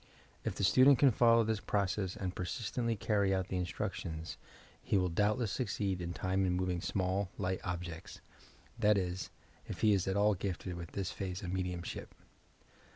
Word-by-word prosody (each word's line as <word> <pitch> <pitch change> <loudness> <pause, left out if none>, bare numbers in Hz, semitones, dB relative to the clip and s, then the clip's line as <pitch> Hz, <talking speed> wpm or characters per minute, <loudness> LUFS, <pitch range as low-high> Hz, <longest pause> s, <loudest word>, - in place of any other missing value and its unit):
If - - -2
the - - -2
student 130 +7 +7
can 140 0 +6
follow 115 0 +5
this 110 -1 0
process 100 -1 -1
and 95 -4 -3
persistently 115 +5 -2
carry 100 -1 +1
out 95 -1 -2
the 95 - -1
instructions, 85 -2 -4 0.5
he - - +1
will 90 -1 +2
doubtless 105 +5 +1
succeed 100 -5 -1
in 85 0 -3
time 95 +2 0
in 90 -1 +2
moving 90 -1 -1
small, 95 0 0
light 95 -1 -1
objects, 85 -2 -5 0.3
— - - -26
that 105 -2 +4
is, 90 0 -2 0.4
if 105 - -6
he 110 -2 +5
is 95 -2 +1
at 95 +1 +1
all 105 +1 +4
gifted 95 -1 -3
with 85 -1 -7
this 100 -1 -2
phase 95 -1 -4
of 90 0 -3
mediumship. 90 -2 -4
95 Hz, 175 wpm, -33 LUFS, 90-105 Hz, 0.5 s, student